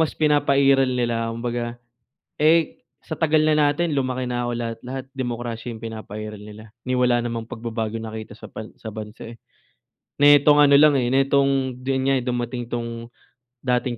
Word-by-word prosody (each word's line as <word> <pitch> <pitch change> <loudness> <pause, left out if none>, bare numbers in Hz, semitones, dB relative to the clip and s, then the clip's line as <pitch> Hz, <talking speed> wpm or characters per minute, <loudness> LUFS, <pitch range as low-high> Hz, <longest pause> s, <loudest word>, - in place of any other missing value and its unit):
mas 160 - 0
pinapairal 140 -3 +3
nila 120 -2 -1
kumbaga, 120 0 -3 0.7
eh, 160 +1 +3 0.2
sa - - -6
tagal 155 -1 +2
na 155 - +4
natin, 150 +1 +1
lumaki 130 -1 -1
na 120 0 -2
ako 120 - -2
lahat-lahat 120 +3 -5
demokrasya 120 -2 -4
yung 110 - -10
pinapairal 110 -1 -7
nila, 105 +1 -11 0.2
ni 130 - -2
wala 120 -1 +3
namang 115 -1 -4
pagbabago 115 -1 -4
nakita 110 -1 -7
sa - - -10
pan 110 0 -8
sa 110 - -8
bansa, 110 +1 -8
eh. - - -20 0.8
Netong 145 0 +6
ano 140 -1 +7
lang, 150 0 +6
eh, 120 -2 +1
netong 135 -1 +2
di 130 +1 -1
yun 130 - -1
nga 135 - +3
dumating 120 0 -3
'tong 115 -1 -5 0.6
dating 125 -1 0
125 Hz, 165 wpm, -23 LUFS, 115-135 Hz, 0.8 s, ano